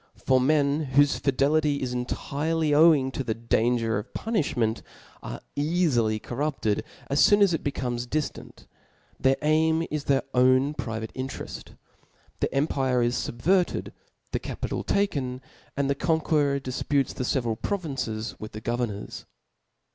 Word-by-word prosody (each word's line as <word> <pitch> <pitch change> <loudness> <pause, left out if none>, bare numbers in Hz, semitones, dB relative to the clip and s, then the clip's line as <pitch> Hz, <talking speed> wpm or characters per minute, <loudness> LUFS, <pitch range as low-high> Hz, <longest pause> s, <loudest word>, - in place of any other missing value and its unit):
For 130 -1 +2
men 145 0 +1
whofe 145 +1 +4
fidelity 145 +2 +2
is 125 -1 -2
intirely 150 +5 -1
owing 150 -3 +5
to 135 - -3
the 110 -3 -2
dansjer 115 -1 +1
of 110 +4 -9
punifliment, 135 - 0 0.4
are - - -7
eafily 145 -8 +1
corrupted 125 -4 -2 0.2
as 140 +1 +4
foon 205 0 +6
as 190 -3 +3
it 165 - -2
becomes 125 -3 -2
diftant; 150 +3 -4 0.5
their 135 0 +3
aim 160 +2 +3
is 150 -1 -3
their 135 -1 +2
own 130 +3 +4
private* 110 -5 -5
intereft. 130 0 -7 0.6
The - - 0
empire 135 -3 +1
is 120 +1 +1
fubverted, 170 +10 0 0.4
the - - -1
capital - - -4
taken, 140 -11 0 0.4
and 140 -1 +1
the 140 - +2
conqueror 150 -2 +1
difputes 135 +1 -1
the - - -4
feveral 120 -4 -1
pro 200 - 0
vinces 125 - -4
with 110 - -8
the 110 - -7
governors. 120 -3 -3
135 Hz, 140 wpm, -26 LUFS, 120-150 Hz, 0.6 s, foon